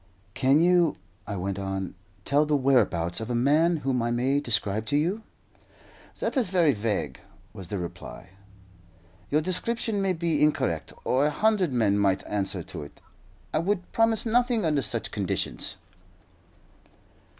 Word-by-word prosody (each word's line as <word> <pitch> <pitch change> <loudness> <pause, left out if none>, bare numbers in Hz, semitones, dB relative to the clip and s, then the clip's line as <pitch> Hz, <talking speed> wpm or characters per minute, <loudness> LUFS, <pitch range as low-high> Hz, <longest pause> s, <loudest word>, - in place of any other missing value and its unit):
"Can 135 +5 +3
you," 175 -3 +4 0.3
I 100 - -3
went 95 +1 -3
on, 95 -1 -4 0.3
"tell 145 +2 +2
the 150 - +2
whereabouts 120 -12 +2
of 110 +1 -5
a 120 - -1
man 155 +7 +3
whom 130 -3 +1
I 120 - 0
may 130 +4 +1
describe 110 -4 0
to 145 - +1
you?" 180 +9 0 1.0
"That - - -2
is 250 -8 +1
very 170 -6 +3
vague," 100 - -2 0.3
was 95 -3 -8
the 100 - -3
reply. 90 0 -8 1.0
"Your 150 +2 +2
description 205 +5 -1
may 195 -1 +1
be 165 -3 0
incorrect, 85 - +1
or 135 +3 +2
a - - +2
hundred 195 0 +1
men 105 -5 +2
might 95 -2 +1
answer 100 -3 -2
to - - -8
it. 70 - -11 0.5
I 155 - +2
would 185 +1 -2
promise 225 -1 +2
nothing 240 -2 +2
under 150 -3 +2
such 105 - -3
conditions." - - -2
140 Hz, 150 wpm, -26 LUFS, -, 1.0 s, you